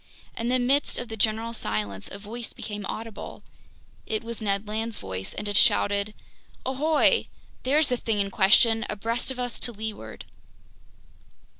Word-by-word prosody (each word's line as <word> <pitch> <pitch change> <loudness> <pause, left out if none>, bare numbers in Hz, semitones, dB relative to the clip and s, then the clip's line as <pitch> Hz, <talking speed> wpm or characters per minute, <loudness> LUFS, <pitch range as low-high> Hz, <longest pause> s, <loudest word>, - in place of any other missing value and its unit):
In 230 - -2
the 255 +1 +3
midst 265 +4 +2
of 245 - -5
the 220 - -4
general 220 +2 +1
silence, 105 - -2
a 195 - -6
voice 220 +3 -7
became 205 -2 -6
audible. 225 -1 -7 0.6
It 220 +1 -1
was 230 0 -6
Ned 200 0 0
Land's 220 +1 -2
voice, 95 0 -5
and 210 - -4
it 205 - -2
shouted: 205 +1 +4 0.5
"Ahoy! 305 - +3 0.3
There's 285 +3 +3
the 250 - +1
thing 225 -3 -1
in 200 0 0
question, 225 +4 +5
abreast 230 +5 -2
of 265 - -1
us 245 -1 -3
to 240 - -1
leeward!" 220 -1 -6
225 Hz, 155 wpm, -26 LUFS, 205-245 Hz, 0.6 s, question